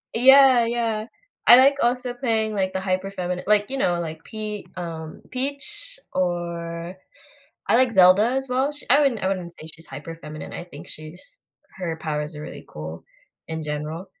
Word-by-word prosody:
Yeah, 260 Hz, 0 st, +7 dB
yeah, 230 Hz, -2 st, -1 dB, 0.4 s
I 240 Hz, -, +11 dB
like 270 Hz, +2 st, +6 dB
also 245 Hz, +1 st, +1 dB
playing, 225 Hz, -4 st, 0 dB
like, 190 Hz, -2 st, 0 dB
the 190 Hz, -, -1 dB
hyper 190 Hz, 0 st, -1 dB
feminine 180 Hz, -2 st, -4 dB
like, 210 Hz, +1 st, +3 dB
you 270 Hz, -, -3 dB
know, 175 Hz, -8 st, +1 dB
like 160 Hz, -1 st, -5 dB
Pe 215 Hz, -2 st, -5 dB
um, 160 Hz, -2 st, -6 dB
Peach 410 Hz, -, -3 dB
or 170 Hz, -1 st, -2 dB, 0.7 s
I -, -, +4 dB
like 255 Hz, -2 st, +4 dB
Zelda 190 Hz, +4 st, +6 dB
as 265 Hz, 0 st, -1 dB
well. 265 Hz, +3 st, +1 dB
Sh 295 Hz, -, -10 dB
I 280 Hz, +4 st, +6 dB
wouldn't 265 Hz, -7 st, +1 dB
I 190 Hz, -, +1 dB
wouldn't 180 Hz, -3 st, -3 dB
say 160 Hz, -, -10 dB
she's 160 Hz, 0 st, -11 dB
hyper 150 Hz, +4 st, -8 dB
feminine. 155 Hz, -1 st, -8 dB
I -, -, -6 dB
think 155 Hz, -4 st, -12 dB
she's 175 Hz, -, -8 dB, 0.4 s
her 170 Hz, -4 st, -3 dB
powers 150 Hz, 0 st, -3 dB
are 150 Hz, -, -7 dB
really -, -, -9 dB
cool 80 Hz, +2 st, -8 dB, 0.4 s
in 160 Hz, -1 st, -4 dB
general, 150 Hz, +4 st, -4 dB
190 Hz, 175 wpm, -24 LUFS, 165-245 Hz, 0.7 s, I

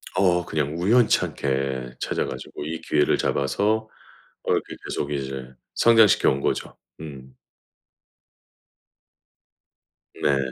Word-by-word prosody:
어. 90 Hz, -2 st, +3 dB
그냥 75 Hz, -1 st, -2 dB
우연치 110 Hz, +7 st, +4 dB
않게 65 Hz, -2 st, -3 dB
찾아 -, -, -1 dB
가지고 65 Hz, +2 st, -7 dB
이 80 Hz, +1 st, -5 dB
기회를 75 Hz, -2 st, +2 dB
잡아서 105 Hz, -, 0 dB, 0.5 s
어 -, -, -1 dB
이렇게 -, -, -2 dB
계속 70 Hz, -, -3 dB
이제 65 Hz, -2 st, -5 dB, 0.2 s
성장시켜 115 Hz, -3 st, +5 dB
온 70 Hz, +1 st, -2 dB
거죠. -, -, -2 dB, 0.2 s
음. 65 Hz, -4 st, -10 dB, 2.9 s
네. 70 Hz, -1 st, +3 dB
75 Hz, 210 characters per minute, -24 LUFS, 65-90 Hz, 2.9 s, 성장시켜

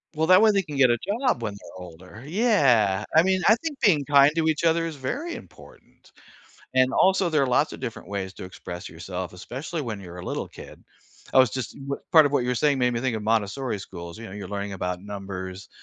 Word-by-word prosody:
Well, 160 Hz, +1 st, 0 dB
that 185 Hz, +2 st, +7 dB
way 220 Hz, -1 st, +6 dB
they 200 Hz, -1 st, +2 dB
can 150 Hz, -3 st, -7 dB
get 130 Hz, -3 st, +5 dB
a 120 Hz, -, +3 dB
job 205 Hz, -, -1 dB
when 105 Hz, -2 st, -3 dB
they're 95 Hz, -2 st, -12 dB
older, 90 Hz, +6 st, -12 dB
yeah, 140 Hz, -, +3 dB
I 160 Hz, -, +7 dB
mean, 190 Hz, 0 st, +1 dB
I 220 Hz, -, +7 dB
think 295 Hz, +2 st, -6 dB
being 160 Hz, -10 st, +3 dB
kind 140 Hz, 0 st, +6 dB
to 160 Hz, -1 st, +1 dB
each 160 Hz, 0 st, 0 dB
other 165 Hz, 0 st, +2 dB
is 160 Hz, -2 st, -5 dB
very 280 Hz, -, -4 dB
important -, -, -16 dB, 0.6 s
and 130 Hz, 0 st, +3 dB
also 190 Hz, -1 st, +3 dB
there 150 Hz, -3 st, +2 dB
are -, -, +2 dB
lots 125 Hz, +4 st, +2 dB
of -, -, -9 dB
different 125 Hz, -4 st, -6 dB
ways 100 Hz, -1 st, -4 dB
to -, -, -9 dB
express 90 Hz, -1 st, -8 dB
yourself, 90 Hz, +2 st, -6 dB
especially 130 Hz, -, -6 dB
when 115 Hz, -7 st, -5 dB
you're 90 Hz, -2 st, -10 dB
a 90 Hz, -, -8 dB
little -, -, -3 dB
kid. -, -, -13 dB, 0.5 s
I -, -, +5 dB
was 130 Hz, -2 st, +6 dB
just 130 Hz, 0 st, -5 dB
m 140 Hz, 0 st, -6 dB, 0.2 s
part 155 Hz, -3 st, +8 dB
of 145 Hz, -, -3 dB
what 135 Hz, -4 st, +2 dB
you're 125 Hz, 0 st, 0 dB
saying 140 Hz, +3 st, +2 dB
made 125 Hz, -1 st, +2 dB
me 115 Hz, -, -2 dB
think 125 Hz, -2 st, -1 dB
of 110 Hz, -, -5 dB
Montessori 110 Hz, +2 st, -1 dB
schools, 85 Hz, -2 st, -9 dB
you 115 Hz, -, -8 dB
know, 95 Hz, -, -10 dB
you're 100 Hz, -2 st, -7 dB
learning 100 Hz, -1 st, -4 dB
about 90 Hz, -1 st, -3 dB
numbers. 95 Hz, -1 st, -7 dB
125 Hz, 235 wpm, -25 LUFS, 100-155 Hz, 0.6 s, part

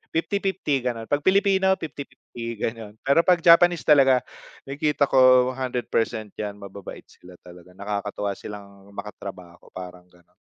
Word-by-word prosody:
50/50 190 Hz, -4 st, -1 dB
gano'n. 115 Hz, -2 st, -3 dB
'Pag 145 Hz, +1 st, 0 dB
Pilipino 190 Hz, 0 st, +3 dB
50/50 140 Hz, -5 st, -9 dB
gano'n. 110 Hz, -1 st, -5 dB
Pero 140 Hz, +4 st, +4 dB
'pag 175 Hz, -1 st, +2 dB
Japanese 175 Hz, 0 st, +6 dB
talaga, 135 Hz, -4 st, +5 dB, 0.4 s
nakikita 145 Hz, +1 st, 0 dB
ko 130 Hz, -1 st, +5 dB
100% 120 Hz, -4 st, -2 dB
'yan, 105 Hz, -1 st, -4 dB
mababait 100 Hz, -1 st, -10 dB
sila 90 Hz, 0 st, -17 dB
talaga. 90 Hz, 0 st, -15 dB
Nakakatuwa 100 Hz, 0 st, -3 dB
silang 100 Hz, -1 st, -11 dB
makatrabaho, 90 Hz, -4 st, -10 dB
parang 90 Hz, -1 st, -9 dB
gan'on. 90 Hz, -1 st, -26 dB
120 Hz, 125 wpm, -24 LUFS, 100-150 Hz, 0.4 s, Japanese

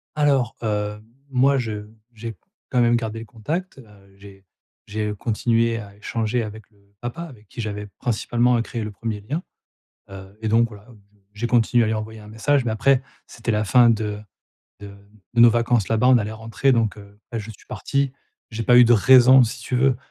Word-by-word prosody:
Alors, 140 Hz, -6 st, +2 dB
hem, 105 Hz, -1 st, -2 dB, 0.3 s
moi, 135 Hz, +1 st, +3 dB
je 105 Hz, -4 st, -4 dB, 0.3 s
j'ai 115 Hz, 0 st, -7 dB, 0.3 s
quand 125 Hz, -, +2 dB
même 120 Hz, 0 st, +4 dB
gardé 115 Hz, -1 st, -3 dB
le 115 Hz, -, -8 dB
contact. 150 Hz, -, -5 dB
Heu, 100 Hz, -5 st, -18 dB
j'ai 100 Hz, -1 st, -15 dB, 0.4 s
j'ai 105 Hz, 0 st, -3 dB
continué 115 Hz, +1 st, 0 dB
à 100 Hz, -2 st, -11 dB
échanger 110 Hz, +3 st, -2 dB
avec 110 Hz, 0 st, -8 dB
le 100 Hz, -1 st, -30 dB
papa 120 Hz, +7 st, -5 dB
avec 120 Hz, -11 st, -13 dB
qui 120 Hz, -, -7 dB
j'avais 105 Hz, -1 st, -5 dB
principalement, 120 Hz, +1 st, +1 dB
heu, -, -, +1 dB
créé 115 Hz, -1 st, -5 dB
le 105 Hz, -, -5 dB
premier 105 Hz, 0 st, -5 dB
lien. 150 Hz, -, -4 dB, 0.7 s
Heu, 95 Hz, +1 st, -11 dB
et 110 Hz, -, -2 dB
donc 115 Hz, +2 st, +3 dB
voilà, 105 Hz, -2 st, -14 dB
bon, 115 Hz, -4 st, -17 dB, 0.3 s
j'ai 105 Hz, +3 st, -3 dB
continué 120 Hz, 0 st, +3 dB
à -, -, 0 dB
lui 110 Hz, -, 0 dB
envoyer 110 Hz, 0 st, -6 dB
un 105 Hz, -, -13 dB
message, 125 Hz, +5 st, +1 dB
mais 120 Hz, -, -1 dB
après 130 Hz, +5 st, +2 dB, 0.2 s
c'était 120 Hz, 0 st, -5 dB
la 105 Hz, -1 st, +1 dB
fin 120 Hz, +3 st, +5 dB
de 105 Hz, -2 st, -1 dB, 0.6 s
de 100 Hz, -, -9 dB, 0.5 s
de 120 Hz, -, +3 dB
nos 120 Hz, 0 st, +9 dB
vacances 120 Hz, -2 st, +1 dB
là-bas, 115 Hz, +2 st, +2 dB
on 130 Hz, -1 st, +6 dB
allait 105 Hz, -1 st, -3 dB
rentrer 115 Hz, +5 st, 0 dB
donc, 115 Hz, -4 st, +1 dB
heu, 100 Hz, 0 st, -15 dB
bah, 115 Hz, -, -3 dB
je 110 Hz, +1 st, -7 dB
suis 105 Hz, -, -15 dB
parti, 140 Hz, -2 st, -1 dB, 0.4 s
j'ai 115 Hz, 0 st, -4 dB
pas 120 Hz, +3 st, +5 dB
eu 125 Hz, -, +9 dB
de 120 Hz, -, +4 dB
raison 130 Hz, +3 st, +7 dB
si 120 Hz, +2 st, -5 dB
tu 125 Hz, -, -2 dB
veux 130 Hz, 0 st, +3 dB
115 Hz, 205 wpm, -22 LUFS, 105-120 Hz, 0.7 s, nos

